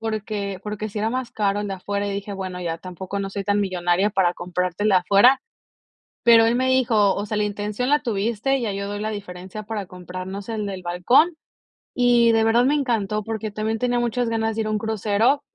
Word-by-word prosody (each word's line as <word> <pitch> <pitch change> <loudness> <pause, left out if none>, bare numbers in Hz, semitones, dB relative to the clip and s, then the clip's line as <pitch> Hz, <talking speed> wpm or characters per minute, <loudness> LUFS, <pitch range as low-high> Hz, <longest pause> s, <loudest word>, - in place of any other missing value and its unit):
Porque 210 -3 -3
porque 210 0 -4
sí 210 - -5
era 220 +2 0
más 255 -1 -3
caro 205 -1 0
el 205 - -3
de 195 - -3
afuera, 200 +2 -3
y - - -2
dije: 200 +1 -5
"Bueno, 185 -2 -5
ya 165 -1 -3
tampoco 185 +2 -6
no 195 - -3
soy 200 0 -4
tan 205 +1 +1
millonaria, 185 0 +1
para 190 -3 +2
comprarte 180 +2 -3
el 215 - +4
de 190 - +5
afuera", 200 +8 +5 0.8
pero 230 -1 +7
él 230 +1 +2
me 260 +1 +1
dijo: 230 -6 +3
"O 205 - -3
sea, 215 - -2
la 210 - +1
intención 210 +4 -2
la 295 +1 +3
tuviste, 235 +4 0
ya 215 -3 -1
yo 200 0 -4
doy 205 0 -4
la 215 +1 -2
diferencia 190 0 -7
para 210 -3 -5
comprarnos 185 +2 -7
el 215 -2 -2
del 190 -2 -6
balcón", 245 - +3 0.6
y 240 -2 +4
de 225 0 +3
verdad 235 +2 +4
me 290 - +3
encantó, 215 -7 0
porque 220 -1 -4
también 215 +1 -2
tenía 245 -1 +1
muchas 240 0 0
ganas 225 -1 -1
de 225 - -1
ir 215 - -2
a - - -1
un 210 - 0
crucero. 220 +5 +1
210 Hz, 225 wpm, -23 LUFS, 195-225 Hz, 0.8 s, pero